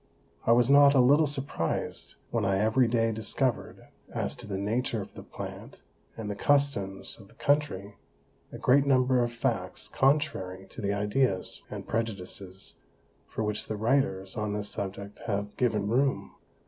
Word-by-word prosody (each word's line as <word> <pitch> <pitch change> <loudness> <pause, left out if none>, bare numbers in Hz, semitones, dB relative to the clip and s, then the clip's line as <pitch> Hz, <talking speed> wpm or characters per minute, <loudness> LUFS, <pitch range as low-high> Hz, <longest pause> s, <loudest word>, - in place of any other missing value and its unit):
I - - +6
was 120 0 +5
not 140 +1 +7
a - - +6
little 145 +5 +5
surprized 135 - -3 0.2
when - - 0
I 95 0 +2
every 110 +5 +3
day 115 -1 +2
discover'd, 110 +3 -2 0.3
as - - -2
to 120 -2 -9
the 100 -2 -3
Nature 115 +4 -1
of 100 - -8
the - - -9
Plant, - - -9 0.4
and 110 -2 -5
the 105 - -2
Customs 100 -8 0
of 100 - -14
the - - -21
Country, 145 -9 0 0.5
a - - -7
great 140 +2 +4
Number 130 -2 +4
of 120 - -1
Facts 120 - -2
contrary 95 -10 0
to - - -8
the 100 -1 0
Ideas, 105 0 0
and - - -7
Prejudices, 100 -4 -4 0.5
for 110 - -3
which 105 0 -2
the 110 - -3
Writers 105 -5 0
on 105 -2 -2
this 105 0 -1
Subject 100 +1 -5
have 100 -1 -2
given 110 -5 +1
room. 130 +5 +1
110 Hz, 160 wpm, -28 LUFS, 100-130 Hz, 0.5 s, not